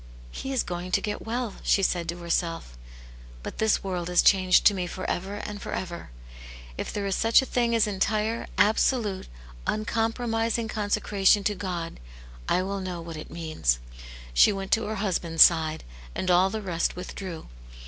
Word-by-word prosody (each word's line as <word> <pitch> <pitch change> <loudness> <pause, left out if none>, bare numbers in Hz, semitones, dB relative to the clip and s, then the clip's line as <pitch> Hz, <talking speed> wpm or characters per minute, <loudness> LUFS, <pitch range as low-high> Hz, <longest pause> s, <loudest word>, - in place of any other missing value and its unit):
" - - -18
He 270 - -5
is 265 - +1
going 180 +1 -5
to - - +4
get 210 +1 -5
well," 235 -2 -3
she 195 - +2
said 175 -3 0
to 170 - -3
herself, 165 - -2 0.3
" - - -18
but - - -7
this 220 -1 +2
world 180 -3 -3
is 180 - +4
changed 185 -2 +5
to 205 - +7
me 180 -2 -2
for 185 +2 -5
ever 190 +3 -3
and 205 0 -6
for - - -5
ever. 175 - -5 0.7
If - - -4
there 205 -1 -3
is 195 -1 0
such 225 +3 +4
a - - -4
thing 240 -2 +1
as 225 - +4
entire, 215 +3 -1
absolute, 215 -1 +2 0.4
un 215 0 -1
compromising 225 0 0
consecration 205 -1 +2
to 210 - +1
God, 180 -4 -5 0.5
I 185 - +2
will 195 +1 -3
know 185 -2 -4
what 165 -1 -7
it 155 - -8
means." 155 - -1 0.6
She 60 - +6
went 195 -1 -5
to 225 - +3
her 220 - -3
husband's 175 -5 +4
side, 160 -2 +2 0.3
and 185 - 0
all 180 +2 +5
the 220 +1 -4
rest 170 -3 -1
withdrew. 180 -2 -7
190 Hz, 185 wpm, -26 LUFS, 170-215 Hz, 0.7 s, to